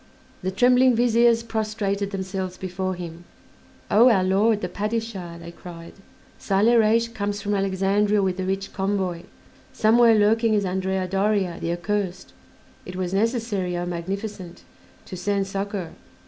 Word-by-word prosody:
The 185 - -2
trembling 250 +5 +4
Viziers 235 0 +3
prostrated 215 -3 -2
themselves 190 -1 -4
before 185 0 -3
him. 170 -1 -8 0.7
"O 235 +4 +7
our 195 -6 +3
Lord, 205 +3 +2
the 180 - -2
Padishah," 205 -3 -4
they 170 0 -9
cried, 170 -1 -11 0.5
"Saleh 215 +5 +3
Reis 225 +1 +3
comes 205 -3 -3
from 205 0 -2
Alexandria 195 +1 +1
with 190 -1 -1
a - - -1
rich 195 +1 -3
convoy; 190 -3 -2 0.5
somewhere 230 +1 +5
lurking 220 +1 +3
is 205 -1 +1
Andrea 190 0 -1
Doria, 195 -2 0
the 170 - -2
accursed; 185 +1 -3 0.5
it 180 - -9
was 185 0 -3
necessary, 205 -4 0
O 175 - -2
Magnificent, 185 +1 -5 0.4
to - - -8
send 200 +1 -1
succor." 195 -2 -4
195 Hz, 140 wpm, -24 LUFS, 185-215 Hz, 0.7 s, O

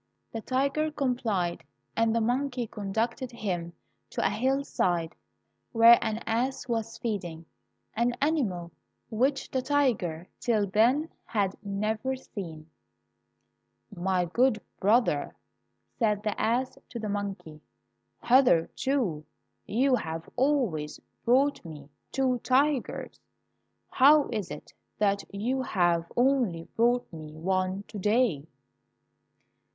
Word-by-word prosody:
The 225 - -5
tiger 275 +5 0
complied, 235 - -1 0.3
and 225 0 +2
the 230 - +2
monkey 250 +2 0
conducted 225 +5 -3
him 180 -7 -3 0.4
to - - -2
a - - +3
hillside 205 - 0 0.6
where 230 +1 +8
an 220 0 -2
ass 250 +3 -1
was 225 -2 -2
feeding 175 -8 -4 0.3
— 85 0 -49
an 235 +2 +1
animal 215 - 0 0.4
which 265 +5 0
the 260 - 0
tiger, 230 - 0
till 220 -4 +1
then, 240 - +2
had 200 -3 -1
never 215 +6 -1
seen. 165 -11 -8 1.3
"My 180 0 0
good 235 +6 +2 0.2
brother," 205 - +2 0.6
said 210 -3 +1
the 210 - -2
ass 240 +4 0
to - - -7
the 220 -2 -4
monkey, 200 -7 -5 0.6
"hitherto 245 - +2 0.4
you 260 +5 +2
have 160 -3 -5
always 245 - 0 0.3
brought 270 +4 +3
me 150 -4 -10 0.2
two 260 -2 +1
tigers, 270 +2 0 0.7
how 290 +2 +6
is 210 -6 -3
it - - -9 0.2
that 200 -1 +1
you 240 +7 -1
have 175 -8 +1
only 245 -10 +2
brought 240 +2 +3
me 155 -1 -9
one 185 +3 -1
to 205 - -9
day?" 210 - +1
220 Hz, 115 wpm, -28 LUFS, 185-255 Hz, 1.3 s, where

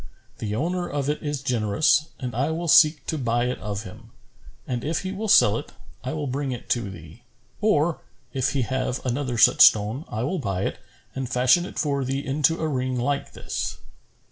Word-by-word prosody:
The 105 -1 -3
owner 175 +7 -2
of 145 0 -1
it 150 - -5
is 145 -2 -3
generous 125 +5 +2
and 125 -3 -4
I 135 +6 0
will 165 +2 -3
seek 150 +1 +5
to 160 - -2
buy 120 -1 0
it 125 - -2
of 105 0 -4
him; 95 - -12 0.6
and, 125 -2 -3
if 155 +2 -1
he 185 - -4
will 210 +3 -4
sell 105 - +5
it, - - -11 0.3
I 130 - -3
will 150 -2 -3
bring 135 +1 -2
it 125 - -6
to 120 -5 0
thee; 85 +3 -12 0.4
or, 170 -6 +2 0.3
if 130 -2 0
he 135 -3 +1
have 130 +1 -2
another 125 -1 -2
such - - +5
stone 110 +8 +5
I 110 +2 -3
will 180 +7 -1
buy 100 -7 -2
it - - -3 0.3
and 135 -2 -4
fashion 130 +8 +3
it - - -11
for 140 -3 0
thee 135 +2 -3
into 150 +4 +1
a 160 - 0
ring 130 -3 -1
like 140 +3 -2
this." - - -4
135 Hz, 200 wpm, -24 LUFS, 120-150 Hz, 0.6 s, seek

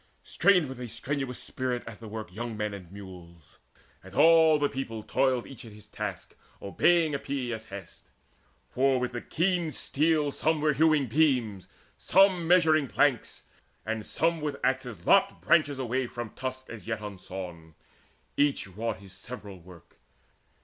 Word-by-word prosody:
Strained 180 -6 +3
with 130 -1 -8
a 125 - -4
strenuous 135 +2 -3
spirit 125 -2 -3
at 115 -2 -9
the 115 - -9
work 110 -3 -7
Young 115 +1 -5
men 105 -1 -2
and 90 -3 -10
mules; 90 -5 -13 0.4
and 95 +1 -13
all 160 -1 +6
the 145 -1 +2
people 125 -6 -5
toiled 130 0 +1
Each 135 -5 -11
at 115 -3 -11
his 105 0 -14
task - - -6 0.2
obeying 160 - +2
Epeius's 125 -5 -3
hest. 100 -3 -11 0.6
For 130 0 +2
with 125 0 -2
the 120 -1 -5
keen 175 -1 0
steel 150 0 +1
some 160 +2 0
were 150 0 +2
hewing 155 0 +3
beams, 125 - +1 0.3
Some 185 -2 +4
measuring 160 -5 +4
planks, - - 0 0.4
and 110 0 -3
some 165 +7 0
with 145 -2 -3
axes 125 -9 -1
lopped - - +4
Branches 150 -5 +3
away 130 0 -1
from 120 -2 -7
trunks 130 0 -5
as 115 -2 -10
yet 110 -1 -2
unsawn: 90 -5 -8 0.6
Each 145 -1 +1
wrought 110 +4 -4
his 95 0 -13
several 105 -6 -9
work. 85 -1 -17
125 Hz, 155 wpm, -28 LUFS, 105-150 Hz, 0.6 s, all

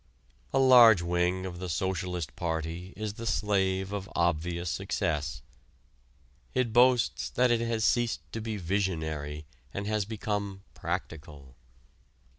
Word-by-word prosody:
A - - +1
large 120 -8 +8
wing 90 +2 0
of 90 -2 -6
the 90 0 -5
Socialist 90 -2 -2
Party 85 +2 -3
is 105 -1 -3
the 115 +2 -6
slave 95 -2 0
of 100 0 -4
obvious 85 0 0
success. 75 -2 -2 1.1
It 125 -3 +1
boasts 125 -1 +3
that 125 0 +2
it 115 -1 +2
has 115 -1 0
ceased 120 -2 +1
to 115 - -4
be 110 -1 -3
"visionary" 80 -6 -2 0.3
and 100 - -3
has 105 -1 0
become 100 -2 -3
"practical." 75 -5 -6
95 Hz, 125 wpm, -29 LUFS, 85-110 Hz, 1.1 s, large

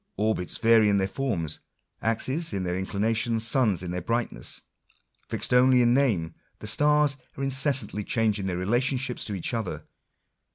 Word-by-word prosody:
Orbits 105 -3 -1
vary 115 -2 +4
in 100 - +3
their 95 -1 +1
forms, 95 - -2 0.4
axes 130 +7 +1
in 95 -2 -2
their 90 -1 -2
in 95 +1 -3
clinations, 115 +2 0
suns 110 -5 +2
in 90 - -5
their 90 0 -3
brightness. 115 +6 -3 0.7
Fixed - - -1
only 125 0 +5
in 120 0 +4
name, 105 - +1 0.2
the - - -10
stars 150 +4 +3 0.2
are 135 - -3
incessantly 135 -5 +1
changing 105 -3 0
their 90 -2 -2
relationships 125 +6 0
to 105 - -3
each 95 - -3
other. 90 -10 -4
115 Hz, 160 wpm, -26 LUFS, 95-130 Hz, 0.7 s, only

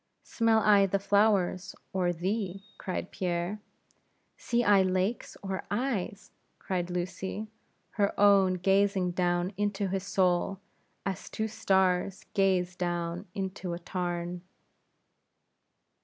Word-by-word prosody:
"Smell 225 -1 +2
I 205 -2 +5
the 195 +1 +1
flowers, 200 -2 +2 0.2
or 180 -2 +1
thee?" 195 +2 -2 0.2
cried 185 -1 -4
Pierre. 175 +2 -2 0.8
"See 240 0 0
I 205 -3 +6
lakes, 185 +4 -1
or 190 -1 -3
eyes?" 205 -4 -2 0.3
cried 180 -2 -2
Lucy, 185 +4 -3 0.5
her 200 -2 0
own 200 -2 +5
gazing 195 0 +2
down 175 +1 0
into 205 -1 -1
his 190 +1 -1
soul, 185 0 +1 0.5
as 195 -1 -4
two 220 - -2
stars 190 -3 +1
gaze 185 -2 +2
down 175 +1 -3
into 190 -2 -3
a - - -3
tarn. 175 0 -3
190 Hz, 110 wpm, -29 LUFS, 180-200 Hz, 0.8 s, I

